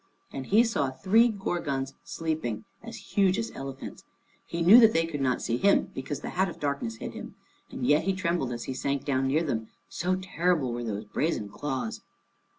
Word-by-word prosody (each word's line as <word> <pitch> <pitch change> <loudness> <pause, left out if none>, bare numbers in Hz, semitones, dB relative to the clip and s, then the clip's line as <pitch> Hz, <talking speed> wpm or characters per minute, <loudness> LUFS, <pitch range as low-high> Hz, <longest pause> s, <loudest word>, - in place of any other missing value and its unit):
And 135 -1 -5
he 215 +4 +5
saw 185 - 0
three 200 - +4
Gorgons 170 - -2
sleeping, 155 -10 -3 0.2
as 230 0 -8 0.2
huge 195 -1 +3
as 230 0 -2
elephants. 135 0 -7 0.4
He 170 0 -2
knew 205 +8 +9
that 225 -2 +7
they 165 0 +2
could 150 -4 -4
not 130 -2 0
see 115 - 0
him, 200 +8 +3
because 140 +2 -5
the - - -5
hat 190 +1 +1
of 170 - -10
darkness 140 -6 -2
hid - - -7
him, - - -8 0.3
and 125 - -4
yet 150 +4 +3
he 195 - +2
trembled 170 -8 -1
as 120 -1 -4
he 130 - -4
sank 140 +1 -2
down 135 -2 +1
near 150 +5 +2
them, 110 -8 -2 0.2
so 180 +2 0
terrible 175 -7 0
were 120 0 -4
those 105 -2 -4
brazen 105 -2 -1
claws. 140 - -4
150 Hz, 195 wpm, -28 LUFS, 130-185 Hz, 0.4 s, knew